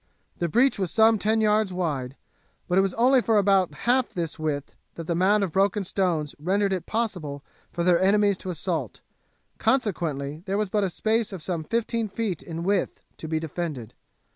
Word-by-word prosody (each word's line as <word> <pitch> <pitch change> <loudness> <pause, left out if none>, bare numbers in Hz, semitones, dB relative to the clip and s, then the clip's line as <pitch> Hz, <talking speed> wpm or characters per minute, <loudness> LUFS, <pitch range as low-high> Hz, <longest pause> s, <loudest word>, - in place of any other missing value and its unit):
The 170 - 0
breach 245 - +3
was 190 -3 0
some 220 +4 +4
ten 220 +2 +1
yards 215 -2 +2
wide, 145 -8 -3 0.5
but 180 +1 +3
it - - +6
was 195 -2 -1
only 255 +3 +4
for 225 -2 +2
about 195 -4 +3
half 250 +1 +2
this 165 -3 -3
width 150 -3 -3 0.2
that 165 - -6
the 170 - -1
mound 195 +4 +3
of 190 - -2
broken 200 +3 +1
stones 175 -6 -1
rendered 195 +5 +1
it 180 -3 -4
possible 180 -11 -3 0.3
for 170 - -2
their 175 0 +4
enemies 200 0 +3
to 185 - -7
assault, 170 -4 -3 0.6
consequently 160 - -1
there 195 +1 0
was 210 -2 -1
but 210 -1 +1
a 195 - +1
space 220 +5 0
of 185 -5 -7
some 170 -3 -2
fifteen 230 +4 -1
feet 200 -4 -3
in 165 0 -6
width 195 +1 0 0.2
to 160 - -7
be 160 0 -1
defended. 155 -7 -5
190 Hz, 190 wpm, -25 LUFS, 165-210 Hz, 0.6 s, it